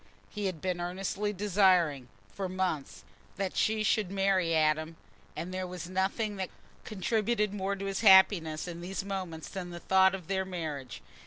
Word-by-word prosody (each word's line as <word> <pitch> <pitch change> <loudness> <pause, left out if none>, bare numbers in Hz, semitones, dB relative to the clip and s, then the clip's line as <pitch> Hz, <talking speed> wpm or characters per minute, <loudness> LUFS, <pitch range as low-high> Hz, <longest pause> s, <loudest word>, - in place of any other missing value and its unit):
He 210 -2 -2
had 175 -5 -5
been 180 -2 -2
earnestly 195 +3 -2
desiring, 185 -9 +2 0.3
for 195 -2 -3
months, 180 -6 -3 0.3
that 195 -1 -2
she 215 0 +1
should 215 -3 +1
marry 195 -4 +1
Adam, 155 +1 +1 0.4
and 170 +4 -5
there 185 0 -3
was 180 -1 -7
nothing 195 +3 -1
that 190 -1 -3 0.3
contributed 210 +1 0
more 200 0 -1
to 195 0 -6
his 195 +1 -2
happiness 190 -6 +5
in 170 -1 -6
these 195 +2 -4
moments 185 -5 -5
than 185 -2 -6
the 175 0 -7
thought 190 +1 +4
of 185 -3 -9
their 190 -1 0
marriage. 155 - -6
190 Hz, 165 wpm, -30 LUFS, 170-195 Hz, 0.4 s, happiness